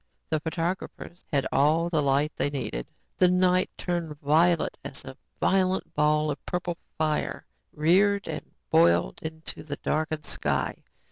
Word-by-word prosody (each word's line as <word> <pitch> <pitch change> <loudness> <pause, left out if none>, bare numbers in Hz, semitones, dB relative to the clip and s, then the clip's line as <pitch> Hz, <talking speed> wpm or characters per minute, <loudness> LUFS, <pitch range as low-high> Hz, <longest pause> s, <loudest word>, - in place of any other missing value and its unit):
The 155 - +2
photographers 170 +2 -4
had 140 -3 +2
all 155 +4 +3
the 160 -3 +1
light 140 +2 +2
they - - 0
needed! 95 - -4 0.3
The 180 - +5
night 180 0 +3
turned 170 -4 -3
violet 160 +4 +3
as - - -8
a 65 - -8 0.2
violent 190 0 +1
ball 150 0 +2
of 145 - -6
purple 175 -1 -2 0.2
fire 155 -1 -1 0.3
reared 195 +6 +3
and - - -6 0.2
boiled 85 +1 +4
into 160 0 -7
the 145 -2 -5
darkened 155 -1 -1
sky. - - -1
160 Hz, 140 wpm, -27 LUFS, 150-175 Hz, 0.3 s, The